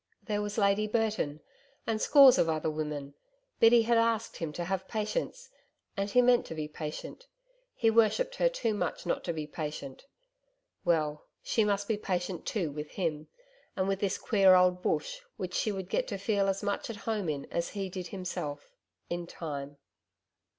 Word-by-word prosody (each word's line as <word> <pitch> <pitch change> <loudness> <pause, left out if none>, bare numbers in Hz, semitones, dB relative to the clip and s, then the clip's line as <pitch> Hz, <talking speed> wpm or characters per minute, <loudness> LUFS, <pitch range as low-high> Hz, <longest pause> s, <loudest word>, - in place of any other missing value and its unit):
There 210 -2 -1
was 205 0 -4
Lady 200 0 +3
Burton 210 -9 -1 0.4
and 220 -1 -1
scores 275 -3 +8
of 165 - +3
other 160 0 0
women 150 -2 -4 0.5
Biddy 230 0 +7
had 230 0 +3
asked 230 -1 0
him 165 -2 -3
to 175 - -3
have 190 +1 -2
patience 475 - -3 0.4
and 200 +1 -1
he 250 +4 +5
meant 245 0 +4
to 160 - -6
be 155 -1 -3
patient 155 - -7 0.5
he 225 -1 +3
worshipped 475 - +2
her - - +4
too 240 - -1
much 205 - -3
not 175 - -1
to 170 - 0
be 155 -2 -4
patient. 150 - -6 0.8
Well, 155 -3 0 0.2
she 225 - +2
must 200 -1 0
be 220 - 0
patient 180 -3 -3
too 175 -9 -1
with 150 +1 -6
him, 155 -5 -2 0.5
and 190 0 0
with 195 -1 0
this 200 -1 0
queer 195 -4 +5
old 180 0 +4
Bush - - -1 0.2
which 180 -1 -4
she 215 - 0
would 190 -2 -5
get - - 0
to 200 - -3
feel 200 0 +1
as 195 +1 -1
much 205 +2 -2
at 230 - -4
home 210 -6 -1
in 140 -2 -3
as 170 0 -1
he 195 -2 -4
did 185 -1 -6
himself 180 - -5 0.3
in 175 0 -4
time. 145 -4 -6
195 Hz, 180 wpm, -30 LUFS, 160-220 Hz, 0.8 s, scores